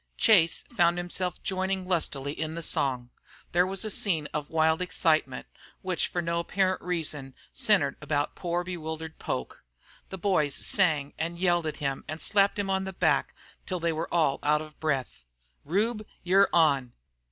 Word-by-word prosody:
Chase 175 -7 +4
found 175 -3 +3
himself 175 0 -2
joining 190 0 -1
lustily 145 -6 -1
in 155 +1 -4
the 170 - -4
song. 125 -5 0 0.4
There 180 +1 +3
was 195 +3 -2
a 215 - -2
scene 165 -7 +2
of 150 -1 -3
wild 160 +1 +2
excitement, 155 -6 +1 0.4
which 185 -2 0
for 175 - -2
no 170 0 0
apparent 185 +2 0
reason 155 -6 -3 0.2
centred 210 -3 +2
about 145 -1 -1
poor 175 0 -2
bewildered 160 -2 -6
Poke. 65 - -4 0.5
The 190 - -6
boys 160 -7 +1
sang 155 -5 +1
and 170 +2 -2
yelled 175 -2 +2
at 155 - -4
him 135 -2 -2
and 155 +1 -5
slapped 200 +2 +2
him 200 -1 -1
on 190 0 0
the 190 - -5
back - - +1 0.3
till 185 -2 -2
they 170 0 0
were 160 +1 -4
all 155 -5 +2
out 150 +1 +2
of 155 -1 -14
breath. 135 - -2 0.4
"Rube, 215 +6 -1 0.2
you're 195 +3 +4
on." 140 -7 +3
170 Hz, 165 wpm, -28 LUFS, 150-185 Hz, 0.5 s, Chase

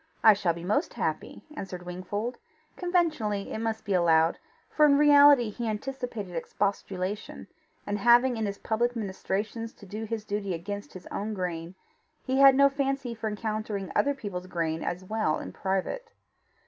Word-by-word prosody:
"I 220 - +9
shall 190 -4 0
be 170 - -8
most 215 - 0
happy," - - -3
answered 180 -8 -6
Wingfold 205 +7 -4 0.4
conventionally, 310 - 0
it - - -3
must 220 -1 -3
be 205 - -1
allowed, 165 -2 +3 0.3
for 305 - +1
in 280 -1 +5
reality 285 -5 +7
he 235 +2 -4
anticipated 220 -4 -5
expostulation, 195 +3 -3 0.4
and 205 0 -2
having 240 +3 +5
in 220 -2 -1
his 200 0 -4
public 240 +2 0
ministrations 215 +2 -3
to 205 - -15
do 215 +3 -5
his 220 -1 -4
duty 200 -3 -2
against 200 +5 -6
his 185 -1 -10
own 210 +1 -3
grain, 175 -1 -4 0.5
he 265 0 +1
had 275 -1 +8
no 280 +1 +7
fancy 275 -2 -1
for 225 -1 -4
encountering 210 -3 -3
other 285 0 +2
people's 190 -8 -6
grain 165 -2 -2
as 180 +1 -3
well 215 -5 0
in - - -7
private. 195 - -2
210 Hz, 160 wpm, -28 LUFS, 190-245 Hz, 0.5 s, I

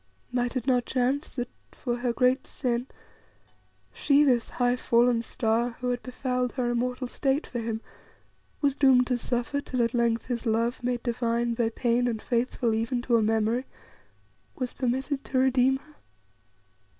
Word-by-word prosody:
Might 245 0 -1
it 250 -2 -2
not 250 -3 +2
chance 260 +3 0
that 245 -2 -3 0.2
for 240 -2 -3
her 245 0 0
great 250 +2 +2
sin, 245 -1 -2 1.1
she, 290 0 +4
this 250 -5 +2
high, 245 0 +1
fallen 240 -1 +3
star, 230 +1 -1
who 250 -1 -1
had 245 - -2
befouled 250 -1 -2
her 245 -2 0
immortal 250 +2 -1
state 270 +3 0
for 240 - -5
him, 225 -1 -3 0.8
was 280 -2 +2
doomed 265 -3 +5
to 250 -1 0
suffer 245 +4 -1
till 255 -3 -1
at 230 - 0
length 235 -1 +1
his 245 -1 -3
love, 230 +2 0
made 245 -1 -1
divine 235 -1 0
by 230 -1 +1
pain 240 +1 +1
and 230 -2 -1
faithful 235 0 0
even 230 +2 -1
to 240 -2 +3
a - - +2
memory, 225 +3 +1 0.9
was 255 -2 -3
permitted 265 +2 -1
to 265 - -3
redeem 260 0 +3
her?" 300 +3 -20
245 Hz, 160 wpm, -27 LUFS, 235-255 Hz, 1.1 s, doomed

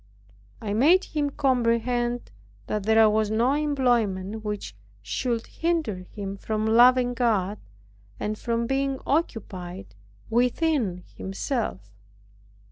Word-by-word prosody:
I 205 -2 -3
made 320 - +5
him 295 -2 -1
comprehend 245 -3 0 0.3
that 210 -2 -3
there 220 0 +6
was 215 0 +2
no 235 +5 +2
employment 235 -9 0
which 210 - -5 0.3
should 235 - -2
hinder 325 - -1
him 200 -1 -5
from 215 +1 -2
loving 245 +2 +5
God, 210 -5 0 0.6
and 210 +1 -2
from 235 +1 -1
being 270 +1 0
occupied 195 - -3 0.3
within 245 - +1
himself. 195 - -3
230 Hz, 105 wpm, -25 LUFS, 210-260 Hz, 0.6 s, there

